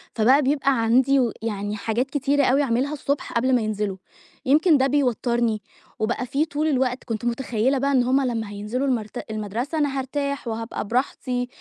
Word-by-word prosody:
فبقى 255 +6 +5
بيبقى 275 -3 +1
عندي 260 +4 +4
و 240 -4 +2
يعني 205 -2 -3
حاجات 230 +5 -1
كتيرة 285 0 +1
أوي 275 +3 +3
أعملها 260 +4 0
الصبح 280 -1 -3
قبل 255 +2 +2
ما 240 - +2
ينزلوا، 210 -2 -2 0.5
يمكن 305 +3 +5
ده 265 +1 +3
بيوتَّرني، 240 -5 +1 0.4
وبقى 235 +3 -1
فيه 280 +5 0
طول 305 0 -2
الوقت 260 -3 0
كنت 230 -1 -4
متخيلة 240 +1 0
بقى 275 +2 +1
إن 255 -3 +4
هم 265 +3 +2
لمّا 225 -3 -2
هينزلوا 210 +7 -3
المرت 220 -3 -3
المدرسة 220 +9 -3
أنا 285 -2 0
هارتاح 280 0 -3
وهابقى 225 -2 -4
براحتي، 250 0 -1
250 Hz, 170 wpm, -23 LUFS, 225-275 Hz, 0.5 s, فبقى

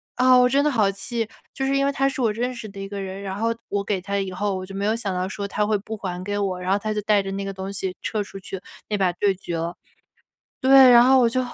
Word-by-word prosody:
啊， 255 0 +5
我 250 0 +6
真 275 +3 +2
的 300 - +3
好 215 -8 +2
气， 225 +3 -3 0.3
就 270 - -2
是 270 +1 +1
因 275 - +2
为 280 - +2
他 275 -1 +1
是 270 -1 -3
我 230 -3 +2
认 245 +4 -2
识 235 -3 -8
的 200 0 -10
一 195 - -5
个 200 0 -5
人， 190 0 -6
然 190 -1 -4
后 225 +3 -1 0.2
我 200 0 -1
给 200 -1 -1
他 200 +2 -2
以 195 -1 -3
后 195 +2 -2
我 185 - -4
就 195 +1 -10
没 200 +1 -2
有 215 +2 +2
想 220 -4 -3
到 180 +1 -1
说 200 +1 -5
他 210 +1 0
会 215 0 +1
不 220 +2 -7
还 180 -3 -5
给 205 +1 -3
我， 195 -3 -1
然 180 +1 -2
后 195 - +4
他 215 +1 -3
就 210 - -2
带 205 -1 +2
着 195 - -5
那 195 +1 -3
个 195 - -4
东 190 +1 -6
西 190 -1 -3
撤 215 - -1
出 195 -1 -10
去 190 0 -7 0.3
那 210 - 0
把 190 -2 +2
对 195 +3 +1
决 175 -2 -5
了。 170 +1 -3 0.9
对， 265 -1 +8
然 240 0 +8
后 260 +1 +6
我 235 - +4
就 255 +3 0
205 Hz, 320 characters per minute, -23 LUFS, 195-235 Hz, 0.9 s, 对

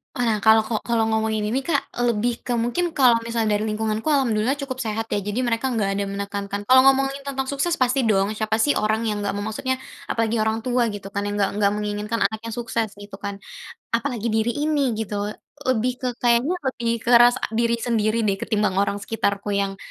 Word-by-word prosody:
Walah, 225 -4 0
kalau 220 0 +7
ko 230 - -2
kalau 230 -2 +1
ngomongin 220 0 0
ini 260 +5 -1
Kak, 285 -1 0
eee 245 - -1
lebih 235 +2 -2
ke - - -4
mungkin 330 +10 0
kalau 255 -6 +5
misal 230 -1 -1
dari 210 0 +1
lingkunganku 220 +5 -1
Ahamdulillah 260 -1 +1
cukup 275 -2 -4
sehat 225 0 -3
ya. 205 - -2
Jadi 210 +5 -2
mereka 240 +1 0
nggak 220 -5 0
ada 200 - -1
menekankan 200 0 -4
kalau 260 0 +7
ngomongin 270 +1 +3
tentang 270 -1 -3
sukses 285 +5 -1
pasti 255 +1 +2
dong, 200 -3 +2
siapa 220 +1 -1
sih 285 +6 +3
orang 220 +2 0
yang 210 -1 -2
nggak 200 - 0
mem 200 - -4
maksudnya 260 +4 -1 0.4
apalagi 225 0 0
orang 220 0 0
tua 240 -1 0
gitu 200 -1 -7
kan, 200 +1 -3
yang 205 0 -2
nggak 200 - +2
nggak 200 -1 +2
menginginkan 210 +2 -2
anaknya 220 +1 -7
sukses 225 -2 -2
gitu 205 -1 -10
kan, 200 0 -4 0.5
apalagi 235 -2 -1
diri 235 +6 0
ini 285 -7 +1
gitu 220 -2 -4 0.2
loh, - - -4 0.4
lebih 250 0 +2
ke 255 - -1
kayaknya 245 +9 +2 0.2
lebih 235 -2 -4 0.2
ke 235 - 0
rasa 245 +1 +5
diri 235 +1 +1
sendiri 230 -1 0
deh, 200 -2 +1
ketimbang 210 -3 +1
orang 200 0 0
sekitarku 205 -1 -2
yang, 200 -1 -1
225 Hz, 205 wpm, -23 LUFS, 210-250 Hz, 0.5 s, kalau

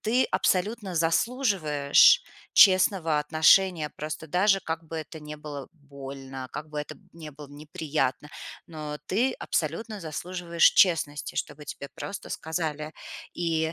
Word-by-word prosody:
ты 245 +4 +2
абсолютно 195 +1 0
заслуживаешь 170 - +3 0.3
честного 185 -5 +5
отношения, 160 +2 +3
просто 155 +1 -6
даже 195 +3 +3
как 160 0 -4
бы 160 +1 -7
это 160 +1 -7
не 150 0 -8
было 145 -2 -8
больно, 135 -3 -9
как 150 +1 -6
бы 150 - -5
это 150 - -8 0.2
не 160 -2 -10
было 145 0 -12
неприятно, 150 -1 -3 0.4
но 150 -2 -6
ты 245 +7 +1
абсолютно 200 +7 -3
заслуживаешь 170 +1 -2
честности, 160 -5 +2
чтобы 145 +1 -5
тебе 140 - -7
просто 200 - -7
сказали 155 -2 -4 0.4
и, 160 -2 -1
160 Hz, 125 wpm, -26 LUFS, 150-180 Hz, 0.4 s, честного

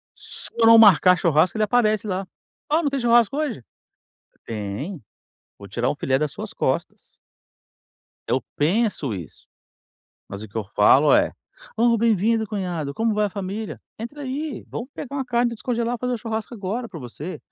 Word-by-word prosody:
Se - - -5
eu 230 - +4
não 230 0 +9
marcar 185 -4 +7
churrasco, 170 +3 +2
ele 215 - +2
aparece 215 -1 +2
lá. 190 0 -3 0.4
"Ah, 315 +3 +2
não 290 - +2
tem 275 0 -2
churrasco 240 +1 +3
hoje?". 270 - -2 0.8
Tem, 115 - -5 0.6
vou 100 - -11
tirar 120 +6 -1
um - - -1
filé 130 -1 +1
das 150 0 -1
suas - - -7
costas. - - -3 1.1
Eu 130 - +1 0.2
penso 165 - +1
isso, 90 -6 -9 0.8
mas 100 +1 -7
o 110 - -8
que 105 - -13
eu 110 - -1
falo 135 +8 +6
é: - - +4 0.4
"Oh, 230 0 +3
bem-vindo, 225 0 +2
cunhado, 180 -8 -3
como 225 0 +1
vai 210 0 +2
a - - -5
família? 200 +2 -5 0.2
Entra 260 +6 -7
aí, 275 -2 -4
vamos 235 - -6
pegar 280 0 -6
uma 270 - -1
carne 240 -1 +1
para 235 - -5
descongelar 235 +1 -1
e - - -20
fazer 250 +1 -2
o - - -4
churrasco 220 +1 -4
agora 225 +3 -4
para 165 - -9
você". 140 +8 -7
215 Hz, 180 wpm, -23 LUFS, 150-235 Hz, 1.1 s, não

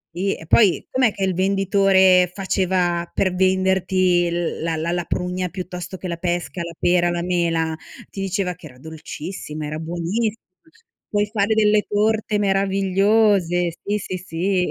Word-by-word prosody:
sì, 195 +3 -1
e - - -12
poi 190 +2 +3
com'è 255 -3 +3
che 195 - -5
il 190 -1 +1
venditore 190 -1 +3
faceva 180 -3 0
per 190 -2 0
venderti 185 -1 +2
l 170 0 -3
la 165 0 -1
la 160 +2 -2
la 175 -1 -2
prugna 180 0 -2
piuttosto 180 0 -7
che 185 - -6
la 170 -1 -4
pesca, 175 +1 -3
la 170 0 -8
pera, 175 0 +3
la 175 0 -2
mela, 165 -2 0 0.4
ti 195 - -6
diceva 190 -1 -1
che 170 -2 -13
era 125 -4 -16
dolcissima, 155 +1 -7
era 150 +1 -5
buonissima, 175 +7 -2 0.7
"Puoi 205 0 +1
fare 210 0 +1
delle 210 -1 +4
torte 215 +1 +1
meravigliose." 195 -2 +2
Sì, 205 +1 -1
sì, 185 -2 -5
sì. 180 +1 -1
185 Hz, 155 wpm, -21 LUFS, 175-195 Hz, 0.7 s, delle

